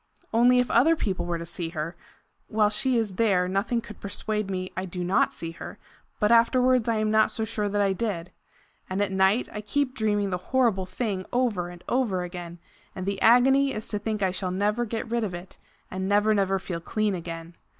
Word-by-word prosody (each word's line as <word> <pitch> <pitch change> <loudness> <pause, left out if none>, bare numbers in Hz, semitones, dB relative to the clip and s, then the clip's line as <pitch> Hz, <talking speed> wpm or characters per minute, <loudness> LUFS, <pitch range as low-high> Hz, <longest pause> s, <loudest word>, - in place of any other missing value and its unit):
Only 245 +2 +5
if 250 0 +2
other 300 +8 +5
people 190 - -2
were 170 -1 -1
to 170 - -6
see 170 0 -5
her! 165 0 -4 0.5
While 215 -1 +2
she 240 +4 +2
is 210 -5 -2
there 190 -5 +3
nothing 200 +5 0
could 215 -2 -12
persuade 210 0 -3
me 185 -1 -3
I 185 - -3
do 180 -1 -5
not 180 +2 +2
see 165 -1 -6
her, 165 - -9 0.4
but 210 0 +2
afterwards 250 +1 +4
I 230 - +2
am 215 0 0
not 220 0 +4
so 220 - -2
sure 210 -2 -2
that 205 0 +1
I 195 -1 +2
did. 190 -5 -3 0.6
And 185 +1 -2
at 200 - -2
night 190 +5 +2
I 210 - -4
keep 255 +5 -1
dreaming 205 -4 0
the 180 - -1
horrible 230 -8 +2
thing 190 -1 -3
over 230 -8 0
and 175 0 -12
over 225 -8 0
again; 175 -1 -7 0.4
and 185 - -5
the 200 0 -2
agony 265 +4 +5
is 215 - -5
to 210 - -2
think 215 -1 -2
I 190 - +2
shall 185 0 -3
never 210 +6 0
get 230 +2 -4
rid 235 0 -1
of 190 -4 -3
it, 175 +2 -11 0.3
and 190 +1 -3
never 210 +1 +3
never 195 -2 +1
feel 180 -2 -5
clean 215 +4 -1
again. 165 -1 -6
205 Hz, 210 wpm, -26 LUFS, 185-230 Hz, 0.6 s, Only